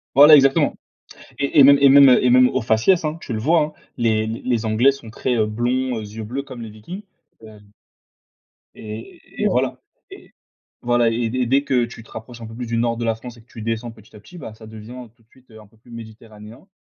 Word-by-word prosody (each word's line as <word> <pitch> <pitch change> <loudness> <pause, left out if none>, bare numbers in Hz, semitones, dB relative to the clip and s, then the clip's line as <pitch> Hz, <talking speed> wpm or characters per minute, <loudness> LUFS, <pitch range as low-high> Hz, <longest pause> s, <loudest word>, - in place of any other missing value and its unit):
Voilà, 145 +3 +9
exactement, 135 -1 +3 0.6
et 140 +1 +2
et - - +10
même 140 +1 +7
et 140 - +6
même, 140 0 +7
heu, 125 - +4
et - - +4
même 125 +1 +5
au 130 - -2
faciès 115 +11 +1
hein? 155 +1 -2
Tu 125 - -8
le 110 - -3
vois 160 +9 +2
hein? 150 0 -2 0.3
Les 110 -2 0
les 115 +1 -3
Anglais 110 +5 +3
sont 140 -4 -10
très, 125 +2 -2
heu, 110 -2 +1
blonds 125 +4 -2
aux 115 - -4
yeux 110 +1 -8
bleus 130 +6 -5
comme 130 -3 -11
les 115 -2 -8
Vikings, 110 - -10 0.4
et 110 - -14 1.3
et 110 +1 -10 0.2
et - - +3
voilà - - -1 0.3
et - - -15 0.5
voilà 120 -1 +2
et 115 0 -2
dès 125 +1 -1
dès 135 +4 +2
que 125 -4 +1
tu 115 -1 -10
te 110 - -20
rapproches 120 +1 -10
un 115 - -8
peu 110 - -11
plus 120 +1 -6
du 115 0 -3
nord 115 0 0
de 120 - -4
la 115 -1 0
France 120 +2 -11
et 115 - -17
que - - -32
tu 115 - -10
descends 115 +1 -4
petit 110 -2 -20
à - - -14
petit 175 - -15
bah 115 -8 -9
ça 110 0 -15
devient 110 +3 -11
tout 115 - -30
de 110 - -36
suite 130 +1 -26
un 110 -1 -15
peu 110 - -28
plus 115 +2 -22
méditerranéen, 110 - -13
120 Hz, 245 wpm, -20 LUFS, 110-130 Hz, 1.3 s, et